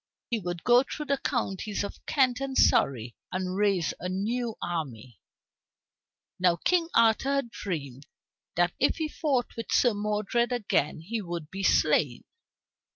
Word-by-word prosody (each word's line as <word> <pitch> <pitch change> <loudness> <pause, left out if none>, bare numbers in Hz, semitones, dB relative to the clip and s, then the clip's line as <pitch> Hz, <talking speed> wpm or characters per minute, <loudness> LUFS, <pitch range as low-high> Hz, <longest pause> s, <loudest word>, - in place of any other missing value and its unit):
He 230 - +1
would 175 -3 -5
go 245 0 +6
through 300 +3 -6
the 280 -1 0
counties 210 -4 -2
of 200 - -7
Kent 255 -3 +2
and 275 -1 -3
Surrey 120 -3 +3 0.2
and 185 0 -2
raise 200 -4 +1
a 180 - -4
new 225 +5 -2
army. 130 -9 -5 1.2
Now 180 -1 +4
King 335 - +1
Arthur 230 +4 +4
had 275 -4 -1
dreamed 140 - -5 0.5
that 175 0 +2
if - - +3
he 320 -1 -2
fought 280 -5 -1
with 230 - -6
Sir 245 -3 +4
Modred 210 +3 0
again 195 - 0
he 220 +7 -3
would 170 -4 -6
be 195 - -5
slain. 150 -8 +2
205 Hz, 150 wpm, -28 LUFS, 170-245 Hz, 1.2 s, go